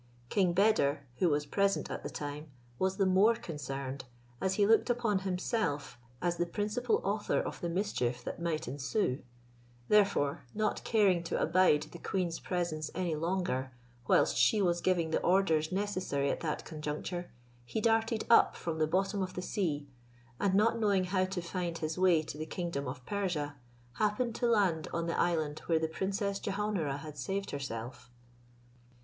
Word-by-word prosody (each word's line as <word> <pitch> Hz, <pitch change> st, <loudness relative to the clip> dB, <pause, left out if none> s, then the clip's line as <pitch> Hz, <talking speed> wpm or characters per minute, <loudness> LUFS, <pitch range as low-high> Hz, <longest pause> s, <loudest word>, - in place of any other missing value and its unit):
King 185 Hz, -4 st, +2 dB
Beder, 175 Hz, -8 st, +3 dB
who 180 Hz, -, +3 dB
was 145 Hz, 0 st, +1 dB
present 200 Hz, +5 st, +1 dB
at -, -, -4 dB
the -, -, -5 dB
time, 150 Hz, +1 st, -6 dB, 0.3 s
was 190 Hz, 0 st, +1 dB
the 195 Hz, -, +3 dB
more 195 Hz, +5 st, +5 dB
concerned, 135 Hz, -, -5 dB, 0.4 s
as 190 Hz, 0 st, +1 dB
he 205 Hz, -, +4 dB
looked 225 Hz, +4 st, +4 dB
upon 235 Hz, -5 st, +1 dB
himself 180 Hz, -, -2 dB, 0.2 s
as 175 Hz, -1 st, +1 dB
the 175 Hz, +1 st, 0 dB
principal 215 Hz, -, 0 dB
author -, -, 0 dB
of -, -, -4 dB
the 170 Hz, -, -1 dB
mischief 170 Hz, -, -1 dB
that -, -, -5 dB
might 160 Hz, -2 st, -1 dB
ensue: 135 Hz, -, -1 dB, 0.7 s
therefore, 200 Hz, -11 st, +3 dB
not 215 Hz, 0 st, 0 dB
caring 200 Hz, -6 st, +3 dB
to -, -, -1 dB
abide 165 Hz, -3 st, +4 dB
the 170 Hz, -, -9 dB
queen's 175 Hz, -3 st, -2 dB
presence 170 Hz, -4 st, -2 dB
any 175 Hz, -2 st, -1 dB
longer, 160 Hz, -6 st, -1 dB, 0.3 s
whilst -, -, +4 dB
she 120 Hz, -, +4 dB
was 175 Hz, -3 st, +2 dB
giving 170 Hz, -3 st, +1 dB
the -, -, +1 dB
orders 170 Hz, -4 st, +2 dB
necessary 185 Hz, -8 st, 0 dB
at -, -, -3 dB
that 155 Hz, -3 st, -3 dB
conjuncture, 155 Hz, +3 st, -4 dB, 0.3 s
he 120 Hz, -, -3 dB
darted 225 Hz, 0 st, +2 dB
up 230 Hz, -, +6 dB
from 160 Hz, -2 st, -4 dB
the 155 Hz, -, +3 dB
bottom 195 Hz, +4 st, 0 dB
of 185 Hz, -1 st, -3 dB
the -, -, -3 dB
sea; 155 Hz, -7 st, -1 dB, 0.5 s
and 195 Hz, -1 st, +2 dB
not 230 Hz, +3 st, +3 dB
knowing 200 Hz, -4 st, +3 dB
how 185 Hz, 0 st, +1 dB
to 185 Hz, -2 st, -4 dB
find 170 Hz, -1 st, -3 dB
his 155 Hz, -1 st, -2 dB
way 180 Hz, -4 st, +4 dB
to 150 Hz, -1 st, -7 dB
the 155 Hz, -, -4 dB
kingdom 170 Hz, -6 st, -3 dB
of 125 Hz, -1 st, -6 dB
Persia, 175 Hz, -8 st, -2 dB, 0.4 s
happened 215 Hz, +3 st, +1 dB
to 240 Hz, -, 0 dB
land 195 Hz, -9 st, +2 dB
on 170 Hz, 0 st, -1 dB
the 170 Hz, -, -1 dB
island 155 Hz, -4 st, +1 dB
where 165 Hz, -, +3 dB
the 160 Hz, 0 st, 0 dB
Princess 195 Hz, +4 st, -2 dB
Jehaun 210 Hz, 0 st, -1 dB
ara 140 Hz, -3 st, -1 dB
had 150 Hz, 0 st, -9 dB
saved 195 Hz, +8 st, -3 dB
herself. 125 Hz, -3 st, -6 dB
175 Hz, 170 wpm, -32 LUFS, 155-200 Hz, 0.7 s, up